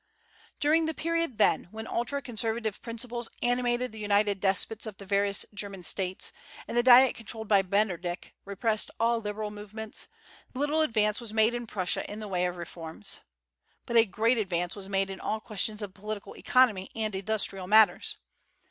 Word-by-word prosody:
During 315 +2 +3
the 320 - -2
period, 335 -6 -1
then, - - +3
when 220 +2 -7
ultra 240 +5 -2
conservative 225 -2 -1
principles 235 0 -3
animated 245 0 +1
the 220 - -10
united 205 -1 +2
despots 200 +3 +1
of 210 -3 -7
the 200 - -10
various 200 +1 +2
German 200 -2 -5
States, 185 0 -1 0.3
and - - -5
the 240 - +5
Diet 255 +1 +8
controlled 220 0 -6
by 200 -2 +5
Metternich 185 -3 -1
repressed 210 +2 0
all 230 0 +2
liberal 210 0 -4
movements, 210 +1 -5 0.5
little 295 +4 +1
advance 220 -5 +1
was 225 -2 -8
made 220 +1 +4
in 240 -1 -4
Prussia 185 -4 -1
in 210 - -6
the 215 - -6
way 180 -2 +1
of 180 - -4
reforms. 170 +2 -5 0.7
But 235 - -4
a 230 -1 +7
great 225 +4 +1
advance 180 -3 -1
was 195 -1 -8
made 195 0 0
in 190 - -7
all 220 - -2
questions 215 0 -2
of 195 -2 -6
political 210 +1 -6
economy 225 -7 +3
and 215 -2 -1
industrial 195 -1 +1
matters. 215 +1 +5
215 Hz, 170 wpm, -29 LUFS, 195-235 Hz, 0.7 s, Diet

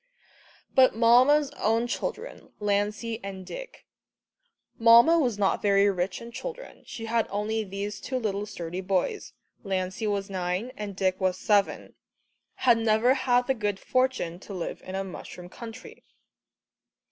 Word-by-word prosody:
But 260 -3 +5
Mamma's 255 +6 +5
own 225 +2 +2
children, 440 - -5
Lancey 210 +2 -1
and 190 -1 -7
Dick - - -9 0.9
Mamma 235 +9 +7
was 245 -8 0
not 200 -2 +1
very 200 0 +4
rich 185 0 -2
in 235 - -9
children, - - -8
she 225 - -7
had 230 0 0
only 215 +2 -1
these 200 +1 -5
two 260 - -3
little 210 -3 -2
sturdy 175 -2 -5
boys, 190 - -1 0.3
Lancey 190 +1 -2
was 200 -1 -1
nine 185 +4 -3
and 205 -4 -6
Dick 185 0 0
was 185 -1 +1
seven 205 -2 +1 0.6
had 240 -3 +3
never 225 +3 +3
had 250 -2 +2
the 265 - +1
good 205 -5 -2
fortune 255 -10 0
to 195 +1 -9
live 175 - -5
in 185 - -7
a 195 - -1
mushroom 180 -1 -9
country. 225 +3 -10
210 Hz, 145 wpm, -27 LUFS, 195-240 Hz, 0.9 s, Mamma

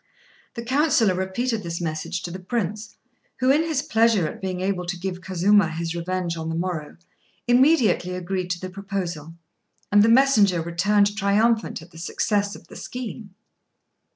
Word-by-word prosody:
The 235 - -5
councillor 260 -6 +3
repeated 210 +6 -2
this 170 -2 -4
message 160 +1 -3
to 175 - -5
the 185 - -6
Prince, 210 +1 -3 0.4
who, 255 +1 +3
in 295 +3 +4
his 320 -4 -1
pleasure 220 -6 +3
at - - -8
being 185 -1 -3
able 185 -2 -2
to 180 0 -3
give 180 0 -5
Kazuma 190 +1 +3
his 165 +1 -4
revenge 175 0 -2
on 160 0 -4
the 165 - -2
morrow, 165 -3 -4 0.5
immediately 245 - +3
agreed 180 0 -3
to 175 -1 -2
the 185 0 -6
proposal, 180 -5 -5 0.6
and 205 0 +6
the 220 - +5
messenger 230 -8 +5
returned 200 +5 +1
triumphant 215 -1 +1
at 175 - -17
the 165 - -12
success 205 +4 -1
of - - -14
the - - -13
scheme. 230 -5 -7
190 Hz, 165 wpm, -23 LUFS, 175-220 Hz, 0.6 s, and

